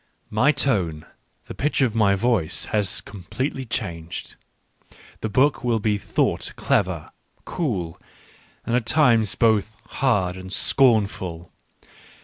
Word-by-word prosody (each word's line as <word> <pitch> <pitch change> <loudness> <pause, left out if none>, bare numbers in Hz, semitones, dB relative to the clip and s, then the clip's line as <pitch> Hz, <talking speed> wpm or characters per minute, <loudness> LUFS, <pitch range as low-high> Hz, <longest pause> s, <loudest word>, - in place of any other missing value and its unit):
My 115 +7 +4
tone, 95 - 0 0.4
the - - -8
pitch 145 +1 0
of 120 -5 +1
my 105 -3 +3
voice, 100 -5 0
has 105 -3 +1
completely 130 - -5
changed; 85 -7 -5 0.8
the 110 - -3
book 135 +6 +2
will 120 -2 +1
be 105 -1 0
thought - - -1
clever, - - 0 0.3
cool, 95 - -3 0.6
and 115 - 0
at 120 -2 0
times 120 -7 +3
both 110 -1 +1
hard 100 -9 0
and 95 0 -9
scornful. 100 -9 +1
110 Hz, 120 wpm, -23 LUFS, 95-125 Hz, 0.8 s, My